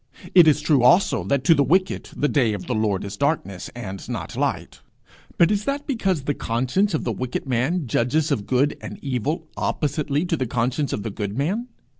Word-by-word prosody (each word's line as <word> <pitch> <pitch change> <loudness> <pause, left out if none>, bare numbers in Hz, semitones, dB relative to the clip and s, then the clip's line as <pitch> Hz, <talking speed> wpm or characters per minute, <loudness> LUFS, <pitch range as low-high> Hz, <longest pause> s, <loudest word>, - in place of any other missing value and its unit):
It 175 -3 +8
is 150 -1 +4
true 150 -3 +3
also 130 +11 +4
that 140 -2 0
to 165 - +6
the 145 - +2
wicked 185 +8 +1
'the 145 - +1
day 125 -7 +2
of 100 - -5
the 125 - -2
Lord 105 -3 0
is 100 0 -6
darkness, 120 - -1
and 95 -6 -7
not - - -5
light;' - - -2 0.6
but 170 +3 +5
is 205 0 0
that 285 +1 -2
because 195 - -1
the 145 - 0
conscience 130 - 0
of - - -2
the 120 - -1
wicked 125 +4 -4
man 135 +7 0
judges 130 +7 +1
of 105 -8 -1
good 135 +3 +2
and - - -7
evil 145 +5 -2
oppositely 150 +1 -1
to 175 - 0
the 130 - -2
conscience 125 +5 -1
of 105 - -3
the 110 - -4
good 100 +1 -4
man? 195 - -1
140 Hz, 205 wpm, -23 LUFS, 120-165 Hz, 0.6 s, It